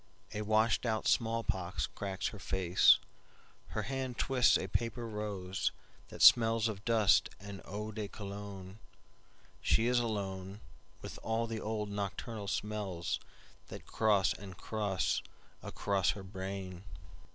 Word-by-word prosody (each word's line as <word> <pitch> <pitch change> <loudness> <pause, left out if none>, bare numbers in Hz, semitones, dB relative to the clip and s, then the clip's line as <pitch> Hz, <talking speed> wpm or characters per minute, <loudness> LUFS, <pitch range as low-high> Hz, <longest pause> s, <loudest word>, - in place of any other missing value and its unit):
A 105 - -2
washed 110 +2 +2
out 110 -3 0
smallpox 110 -5 0
cracks 100 -1 -3
her 105 - -10
face, 95 -1 +5 0.7
Her 110 - -3
hand 130 0 -3
twists 130 -2 +4
a 95 - -3
paper 115 +4 -2
rose, 100 -4 -2 0.4
That - - -2
smells 115 -1 +7
of 105 -3 -5
dust 110 -3 +4
and 100 0 -8
old 105 +2 -5
Cologne, 100 -1 -8 0.8
She 115 - +3
is 125 0 +3
aloneWith 100 -3 -6
all 115 +1 0
the 115 -1 -4
old 105 -1 -3
nocturnal 100 +1 -4
smellsThat 100 -5 -5
cross 105 -4 +3
and 95 -2 -10
cross 105 -4 -1 0.4
across 100 -2 0
her 100 - -7
brain. 95 -1 -6
105 Hz, 120 wpm, -33 LUFS, 95-110 Hz, 0.8 s, smells